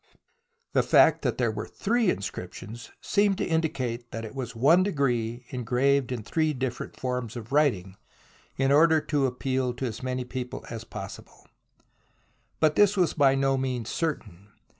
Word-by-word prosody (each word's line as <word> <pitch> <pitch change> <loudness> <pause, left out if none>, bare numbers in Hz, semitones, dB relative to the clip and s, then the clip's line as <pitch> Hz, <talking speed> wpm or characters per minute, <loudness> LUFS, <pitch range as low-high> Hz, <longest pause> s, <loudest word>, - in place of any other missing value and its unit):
The - - +4
fact - - +5
that - - -1
there - - +1
were - - -5
three 225 -1 +1
inscriptions 105 - -5
seemed 200 -1 +2
to - - -1
indicate 130 -8 -2
that 115 0 -5
it 110 - -9
was 125 -3 -5
one 145 +10 +5
decree 125 - -1
engraved 130 +2 +1
in 120 -3 -3
three 155 +6 0
different 130 -2 -4
forms 125 -3 -3
of 120 0 -8
writing 115 -11 +1 0.6
in 135 0 +2
order 160 +2 +5
to 145 -3 0
appeal 130 0 -2
to 130 - -3
as 115 -1 -5
many 130 -1 -3
people 125 0 -6
as 115 -1 -5
possible. 95 -3 -10 1.1
But 155 -1 +3
this 205 0 +4
was 180 -3 +2
by 140 -3 +4
no 135 0 +2
means 125 -3 -2
certain. 105 - -3
130 Hz, 160 wpm, -27 LUFS, 120-150 Hz, 1.1 s, fact